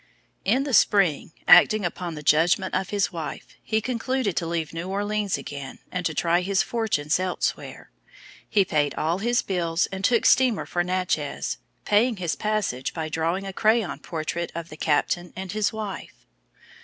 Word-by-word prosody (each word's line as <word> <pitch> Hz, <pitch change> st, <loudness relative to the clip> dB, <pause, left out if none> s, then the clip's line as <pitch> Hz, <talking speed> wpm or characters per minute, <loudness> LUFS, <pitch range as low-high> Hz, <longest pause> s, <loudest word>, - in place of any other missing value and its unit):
In 245 Hz, +8 st, +2 dB
the 280 Hz, -2 st, -4 dB
spring, 195 Hz, -10 st, +3 dB, 0.2 s
acting 215 Hz, -4 st, +7 dB
upon 175 Hz, -1 st, -4 dB
the 150 Hz, -, -8 dB
judgment 170 Hz, +6 st, +3 dB
of 190 Hz, 0 st, -1 dB
his 205 Hz, -1 st, 0 dB
wife, 165 Hz, -3 st, -6 dB
he 220 Hz, 0 st, 0 dB
concluded 250 Hz, -3 st, -1 dB
to 170 Hz, -, 0 dB
leave 165 Hz, -2 st, -3 dB
New 165 Hz, +3 st, -5 dB
Orleans 205 Hz, 0 st, -1 dB
again, 140 Hz, -2 st, -7 dB
and 180 Hz, -1 st, -3 dB
to 160 Hz, -, -5 dB
try 170 Hz, +3 st, +2 dB
his 190 Hz, +1 st, +1 dB
fortunes 190 Hz, -10 st, 0 dB
elsewhere. 185 Hz, -1 st, -3 dB, 0.6 s
He 200 Hz, -2 st, +3 dB
paid 150 Hz, -4 st, 0 dB
all 165 Hz, +4 st, 0 dB
his 240 Hz, +3 st, +1 dB
bills 170 Hz, -3 st, 0 dB
and 190 Hz, 0 st, -5 dB
took 235 Hz, +3 st, +3 dB
steamer 255 Hz, -5 st, +4 dB
for 175 Hz, -, -1 dB
Natchez, 180 Hz, -5 st, -2 dB, 0.3 s
paying 220 Hz, +2 st, +3 dB
his 175 Hz, -3 st, -2 dB
passage 210 Hz, -, -2 dB
by 160 Hz, -2 st, -3 dB
drawing 165 Hz, +5 st, -1 dB
a 195 Hz, -, -5 dB
crayon 220 Hz, -1 st, +1 dB
portrait 165 Hz, +1 st, -4 dB
of 170 Hz, 0 st, -5 dB
the 155 Hz, -, -9 dB
captain 165 Hz, +4 st, 0 dB
and 190 Hz, -1 st, -5 dB
his 210 Hz, 0 st, 0 dB
wife. 215 Hz, -3 st, -7 dB
185 Hz, 170 wpm, -25 LUFS, 165-210 Hz, 0.6 s, acting